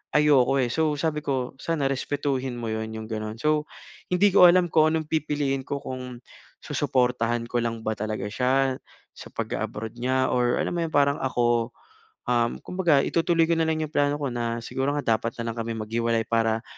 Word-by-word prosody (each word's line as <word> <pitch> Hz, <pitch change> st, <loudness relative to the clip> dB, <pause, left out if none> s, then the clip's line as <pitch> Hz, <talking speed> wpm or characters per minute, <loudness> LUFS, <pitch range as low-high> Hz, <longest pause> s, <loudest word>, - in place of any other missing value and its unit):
ayoko, 145 Hz, -3 st, +4 dB
eh. 120 Hz, -, -1 dB
So 155 Hz, -2 st, +1 dB
sabi 150 Hz, 0 st, -1 dB
ko 130 Hz, -3 st, -2 dB
sana 165 Hz, -4 st, -1 dB
respetuhin 135 Hz, -1 st, -2 dB
mo 120 Hz, -, -5 dB
'yon 110 Hz, 0 st, -3 dB
'yong 110 Hz, -, -6 dB
gano'n. 110 Hz, 0 st, -4 dB
So 150 Hz, +2 st, +1 dB, 0.4 s
hindi 195 Hz, +3 st, +4 dB
ko 180 Hz, -2 st, +9 dB
alam 180 Hz, 0 st, +4 dB
kung 155 Hz, -1 st, +5 dB
anong 160 Hz, -1 st, -1 dB
pipiliin 145 Hz, -3 st, 0 dB
ko 140 Hz, -, -2 dB
kung 125 Hz, -1 st, -6 dB, 0.5 s
susuportahan 120 Hz, -2 st, 0 dB
ko 120 Hz, 0 st, -1 dB
lang 115 Hz, -1 st, -3 dB
ba 110 Hz, -, 0 dB
talaga 110 Hz, -1 st, -4 dB
siya, 130 Hz, +3 st, +1 dB, 0.4 s
sa -, -, -10 dB
pag-a-abroad 110 Hz, +2 st, -4 dB
niya 130 Hz, +1 st, +1 dB
or 125 Hz, -1 st, +2 dB
alam -, -, -1 dB
mo -, -, -1 dB
'yong 160 Hz, -, -11 dB
parang 140 Hz, 0 st, +3 dB
ako, 120 Hz, -2 st, +1 dB, 0.6 s
um, 120 Hz, -1 st, +1 dB
kumbaga 170 Hz, -7 st, +2 dB
itutuloy 165 Hz, 0 st, +2 dB
ko -, -, +2 dB
na 165 Hz, -, +2 dB
lang 155 Hz, 0 st, 0 dB
'yong 155 Hz, -, -8 dB
plano 145 Hz, -1 st, +2 dB
ko 140 Hz, -3 st, -3 dB
na 120 Hz, -1 st, -2 dB
siguro 135 Hz, +3 st, -1 dB
nga 115 Hz, -6 st, +2 dB
dapat 115 Hz, 0 st, -4 dB
na 115 Hz, 0 st, -2 dB
lang -, -, -13 dB
kami 115 Hz, 0 st, -3 dB
maghiwalay. 115 Hz, +1 st, -1 dB
Para 115 Hz, 0 st, +1 dB
130 Hz, 190 wpm, -25 LUFS, 115-150 Hz, 0.6 s, ko